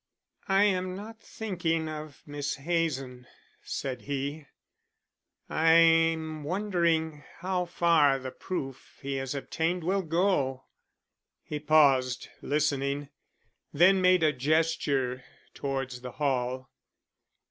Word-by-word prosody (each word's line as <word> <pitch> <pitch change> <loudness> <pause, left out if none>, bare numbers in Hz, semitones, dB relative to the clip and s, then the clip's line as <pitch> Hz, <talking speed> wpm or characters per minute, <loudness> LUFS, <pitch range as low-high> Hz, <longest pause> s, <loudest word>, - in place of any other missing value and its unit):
"I 195 +1 +4
am 185 -2 +1
not 220 +3 -9
thinking 170 -7 -2
of 155 -2 -8
Miss 145 -1 -3
Hazen," 135 -5 -2 0.3
said 130 -2 -4
he. 140 +1 -4 1.0
"I'm 165 -1 +3
wondering 170 -4 0
how 180 0 -1
far 165 -5 +3
the 130 -1 -6
proof 135 -8 -6
he 135 0 -2
has 135 +1 -3
obtained 165 +5 -2
will 190 +3 +1
go." 165 -6 0 0.8
He 150 - -5
paused, 135 -5 +3
listening, 145 -1 -1 0.6
then 185 +5 +5
made 185 -2 +4
a 155 -1 +4
gesture 140 -3 0 0.3
towards 135 -2 -4
the 125 -1 -8
hall. 130 -2 -2
155 Hz, 105 wpm, -28 LUFS, 135-170 Hz, 1.0 s, then